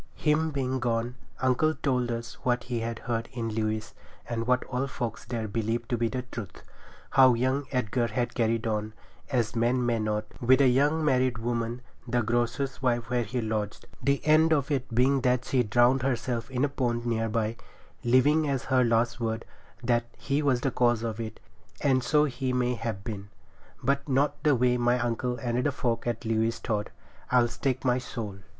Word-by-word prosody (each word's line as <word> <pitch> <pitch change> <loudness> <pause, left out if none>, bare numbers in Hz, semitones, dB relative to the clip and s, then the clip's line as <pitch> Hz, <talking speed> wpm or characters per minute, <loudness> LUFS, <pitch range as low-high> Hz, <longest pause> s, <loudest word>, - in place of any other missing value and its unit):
Him 155 +1 +2
being 130 -3 -1
gone, 120 0 -1 0.3
uncle 130 +5 +3
told 125 -3 0
us 115 0 -4
what 125 -1 +1
he 120 -2 -3
had 115 0 -3
heard 115 -1 -3
in 115 -2 -3
Lewes, 110 0 -2 0.3
and 115 0 -3
what 125 0 +3
all 130 +1 -2
folks 120 -4 -4
there 115 -3 -3
believed 115 +2 -2
to 120 - +1
be 115 - +2
the 125 +2 -3
truth; 105 -7 -7 0.5
how 130 -2 +6
young 130 +3 0
Edgar 125 -2 0
had 120 +2 -2
carried 115 -2 0
on, 110 -1 -2 0.4
as 120 -4 0
men 120 +2 +2
may 120 -1 +1
not, 105 0 -1 0.2
with 130 +2 +5
a 140 - +6
young 145 +5 +2
married 130 -4 +2
woman, 120 +1 -2 0.2
the 120 0 +1
grocer's 120 +4 -1
wife 120 -2 0
where 125 -1 +2
he 120 +2 -2
lodged, 110 -2 -3 0.2
the 140 +2 +2
end 155 +1 +5
of 145 -2 +2
it 135 -2 -1
being 130 +4 +3
that 125 -1 +1
she 130 - +2
drowned 120 +4 +3
herself 120 -2 -1
in 130 +1 +1
a - - +1
pond 120 -4 -1
near 115 -1 0
by, 110 0 -1 0.5
leaving 145 +5 +4
as 135 -1 -1
her 130 -2 +3
last 120 +1 +1
word 115 -1 -2 0.4
that 120 -1 +2
he 140 +2 -1
was 135 -4 +2
the 135 - 0
cause 120 -2 +2
of 115 -1 -3
it; 110 -2 -5 0.4
and 130 -3 +3
so 150 +4 +3
he 130 -2 -2
may 125 0 +1
have 115 -4 -4
been, 100 -3 -6 0.5
but 140 +1 0
not 145 +2 +1
the 150 -3 +4
way 125 0 +2
my 120 0 +2
uncle 125 +1 -1
and 120 0 -1
the 145 - +2
folk 120 -4 -1
at 120 +1 -2
Lewes 115 0 +1
thought, 110 -3 -2 0.4
I'll 125 -1 +5
stake 130 +2 -2
my 125 0 +3
soul. 110 -6 -6
120 Hz, 190 wpm, -28 LUFS, 115-130 Hz, 0.5 s, how